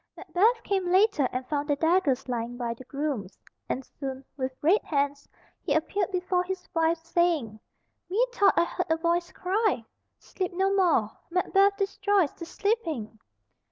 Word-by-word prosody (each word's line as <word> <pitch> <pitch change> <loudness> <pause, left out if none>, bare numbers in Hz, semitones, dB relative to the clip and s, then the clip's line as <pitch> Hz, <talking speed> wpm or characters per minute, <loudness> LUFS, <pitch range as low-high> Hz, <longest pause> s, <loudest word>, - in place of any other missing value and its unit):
Macbeth 455 +6 +2
came 380 -3 0
later, 375 - +4
and 255 +1 -3
found 290 +1 -2
the 290 - +3
daggers 310 -5 +2
lying 240 -1 -3
by 240 -2 -2
the 235 - -12
grooms; 270 -10 -4 0.3
and 260 - -2
soon 270 -1 -7
with 260 -2 -2
red 350 +8 +4
hands 285 -1 -1 0.3
he - - 0
appeared 360 +4 0
before 365 -1 0
his 370 0 -5
wife, 330 0 +2
saying, 330 -11 +1 0.5
"Methought 445 0 +3
I - - +6
heard 360 +1 -3
a 320 - +3
voice 340 +1 0
cry, 380 - 0 0.3
'Sleep 370 -2 -5
no 385 +2 +1
more! 340 - +3 0.2
Macbeth 390 +3 +3
destroys 395 -4 +1
the 335 - -8
sleeping.'" 330 - -2
340 Hz, 155 wpm, -27 LUFS, 275-385 Hz, 0.5 s, I